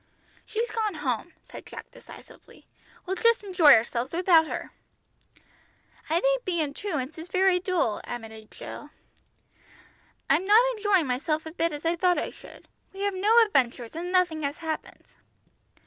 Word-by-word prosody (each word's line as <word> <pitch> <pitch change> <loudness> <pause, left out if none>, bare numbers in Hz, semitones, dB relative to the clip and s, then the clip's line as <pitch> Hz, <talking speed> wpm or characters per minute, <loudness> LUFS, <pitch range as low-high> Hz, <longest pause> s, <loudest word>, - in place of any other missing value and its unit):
"She's 455 +2 -3
gone 435 -5 -2
home," 295 +2 -3
said - - -11
Jack - - -10
decisively. - - -16 0.4
"We'll 380 +1 -3
just 465 +2 +3
enjoy 360 - +6
ourselves 235 +5 -1
without 340 -3 +4
her." - - -6 1.4
"I 330 +2 +2
think - - +1
being 325 -6 -2
truants 310 -6 -4
is 325 - -8
very 370 0 +2
dull," 355 - -1
admitted 220 -2 -8
Jill. 295 - -10 1.4
"I'm 380 - +2
not 420 +2 +7 0.2
enjoying 410 -5 +2
myself 305 +5 -2
a 320 - -7
bit 335 0 -1
as 295 +1 -7
I 335 +1 +2
thought 355 0 +2
I - - -2
should. - - -15 0.3
We 390 - -8
have 405 0 0
no 430 +5 +5
adventures, 250 - -1
and 350 +2 -4
nothing 360 -4 +1
has 285 0 -3
happened." 320 -2 -6
335 Hz, 150 wpm, -26 LUFS, 295-385 Hz, 1.4 s, not